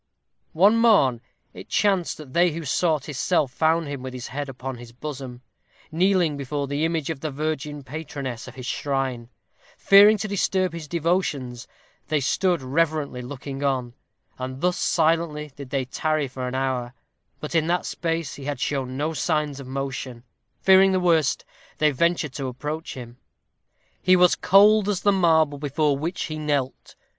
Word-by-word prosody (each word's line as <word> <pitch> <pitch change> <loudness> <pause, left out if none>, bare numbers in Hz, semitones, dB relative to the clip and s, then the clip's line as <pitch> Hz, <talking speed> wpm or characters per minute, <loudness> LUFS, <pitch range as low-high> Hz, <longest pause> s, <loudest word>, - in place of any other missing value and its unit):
One 200 +7 +5
morn 195 - +4 0.3
it - - -11
chanced 195 -4 +1
that 145 -4 -11
they 175 -1 +3
who 165 0 -5
sought 155 0 +1
his 145 -4 -6
cell 175 -5 +2
found 160 +4 +1
him 140 -2 -5
with 130 0 -6
his 125 - -7
head 145 +1 -4
upon 130 0 -6
his 120 -1 -11
bosom, 130 -1 -7 0.5
kneeling 175 -2 +2
before 140 +1 -3
the 145 +2 -2
image 165 -2 -1
of 155 - -6
the 155 - -3
virgin 150 0 -4
patroness 135 -3 -6
of - - -11
his 130 -2 -8
shrine. 130 -4 -2 0.5
Fearing 205 +2 +7
to 215 - -3
disturb 190 -3 0
his 165 -2 -7
devotions, 150 -8 -1 0.4
they 155 0 +1
stood 175 +3 +1
reverently 150 -1 0
looking 135 +2 -7
on; 130 -4 -1 0.5
and 130 +1 -5
thus 180 0 +2
silently 160 -2 0
did 140 -2 -9
they 135 -1 -1
tarry 155 +2 -1
for 130 -1 -5
an 125 - -4
hour; 130 -2 -2 0.4
but, 150 - -6
as - - -4
in 155 - -5
that 175 +1 0
space 165 -2 -2
he 140 - -9
had 145 -2 -3
shown 130 -2 -2
no 155 +3 -1
signs 150 -3 -1
of 135 - -9
motion, 130 -2 -5 0.4
fearing 190 0 +6
the 185 - +2
worst, 165 -5 +2 0.3
they 155 0 +3
ventured 165 0 0
to 135 -1 -4
approach 150 +6 -5
him. 120 -2 -9 0.8
He 185 0 +5
was 180 -1 +5
cold 205 +1 +5
as 195 -3 -1
the 205 - +4
marble 160 -6 +3
before 145 0 +1
which 165 +6 -3
he 155 -2 -5
knelt. 145 -4 -2
150 Hz, 170 wpm, -24 LUFS, 135-170 Hz, 0.8 s, Fearing